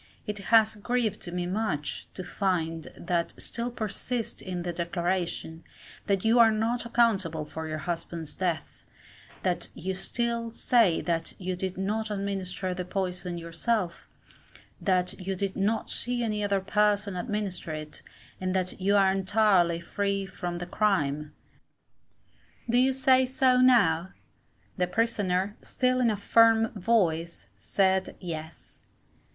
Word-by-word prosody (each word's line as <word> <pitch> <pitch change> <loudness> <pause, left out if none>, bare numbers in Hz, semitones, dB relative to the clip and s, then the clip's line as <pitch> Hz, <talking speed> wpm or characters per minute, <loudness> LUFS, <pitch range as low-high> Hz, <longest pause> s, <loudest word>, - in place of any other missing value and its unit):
It 210 -2 -4
has 220 -1 +6
grieved 220 -4 -1
me 180 0 -2
much 180 -6 -2
to 185 - -5
find 165 -4 -1
that 170 -1 -2
still 235 +1 -3
persist 230 +1 -4
in 180 -2 -4
the 175 0 -3
declaration, 170 -1 -2 0.4
that 200 0 +1
you 230 +2 +5
are 230 -1 +8
not 230 +2 0
accountable 200 -10 +2
for 160 +1 -6
your 155 0 -3
husband's 165 -1 -4
death; 175 -5 -3 0.6
that - - 0
you 190 +2 -3
still 235 +4 -2
say 230 -9 +3
that 165 -1 -2
you 185 -1 -2
did 185 0 -3
not 215 +3 -1
administer 195 -2 -3
the 180 - -3
poison 180 -1 -3
yourself; 170 +3 -2 0.7
that 185 -2 +1
you 190 +1 -3
did 195 +1 -2
not 210 +3 0
see 245 0 0
any 210 -2 -1
other 200 -1 +1
person 205 0 +1
administer 190 -2 -3
it, 155 -1 -7 0.4
and 185 0 -1
that 185 0 -1
you 200 +2 +3
are 195 -1 +5
entirely 190 -3 +3
free 200 +3 -1
from 175 -2 -5
the 175 - -4
crime. 150 -7 0 1.4
Do 240 +1 +3
you 260 +1 +4
say 260 0 +4
so, 260 -1 +3
now? 190 -9 +4 0.6
The 180 -1 +1
Prisoner, 205 -2 0
still 255 -1 0
in 245 -2 +3
a 210 - 0
firm 225 +2 +5
voice, 170 - 0
said, 190 - +1
Yes. 160 -3 -8
190 Hz, 135 wpm, -28 LUFS, 175-220 Hz, 1.4 s, are